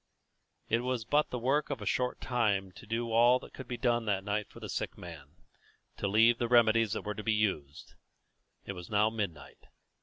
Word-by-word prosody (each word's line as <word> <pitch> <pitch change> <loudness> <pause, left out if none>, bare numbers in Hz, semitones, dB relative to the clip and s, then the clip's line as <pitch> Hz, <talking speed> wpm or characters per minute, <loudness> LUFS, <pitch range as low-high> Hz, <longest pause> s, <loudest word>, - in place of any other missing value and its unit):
It 115 - +2
was 125 -2 -2
but 145 +5 +2
the 125 - -3
work 135 +5 +1
of 140 -4 -3
a 105 - -7
short 125 +4 0
time 105 -6 0
to 105 - -14
do 115 +1 -2
all 120 +2 +5
that - - -13
could 130 - -9
be 125 - -4
done 120 -2 +1
that 100 -3 0
night 105 +1 -2
for - - -13
the - - -7
sick - - -4
man, 80 -3 -11 0.6
to 100 - -2
leave 115 +4 +4
the 120 - 0
remedies 115 -2 +4
that - - -3
were 105 - -3
to 110 - -6
be 110 - +1
used. 95 -10 -2 0.7
It 100 - -5
was 90 -2 -9
now 105 +1 +3
midnight. 95 -11 -6
110 Hz, 210 wpm, -31 LUFS, 100-120 Hz, 0.7 s, all